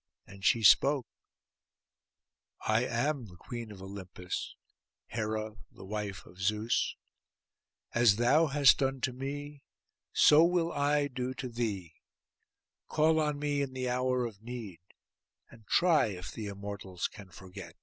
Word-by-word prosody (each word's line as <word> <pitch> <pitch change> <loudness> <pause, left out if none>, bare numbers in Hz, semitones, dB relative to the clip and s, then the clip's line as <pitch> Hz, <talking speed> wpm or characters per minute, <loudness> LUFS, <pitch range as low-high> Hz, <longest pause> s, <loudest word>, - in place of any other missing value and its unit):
And 100 0 -14
she 115 +2 +3
spoke, 135 +5 +6 1.6
'I 110 +3 +2
am 130 +2 -1
the 90 - -14
Queen 115 +3 -7
of 95 -2 -10
Olympus, 95 -2 -6 0.5
Hera 110 -1 -3
the - - -12
wife 105 -1 -5
of 90 +2 -14
Zeus. 110 +3 0 1.0
As 120 -4 +5
thou 135 +8 +4
hast 140 -1 +5
done 135 -1 0
to 125 - -1
me, 145 +2 -6 0.5
so 150 +2 +7
will 170 -1 +2
I 145 0 +1
do 130 -1 -4
to 130 - -5
thee. 105 -8 -3 0.9
Call 160 +1 +3
on 150 -1 0
me 145 -1 -1
in 135 -2 -3
the 130 -1 -2
hour 125 0 +1
of 105 -4 -8
need, 115 -7 -7 0.7
and 115 -3 -17
try 170 -7 +4
if 90 -4 -6
the 110 -2 -6
Immortals 100 -2 -5
can 100 -2 -13
forget. 90 -1 -11
120 Hz, 140 wpm, -31 LUFS, 100-140 Hz, 1.6 s, so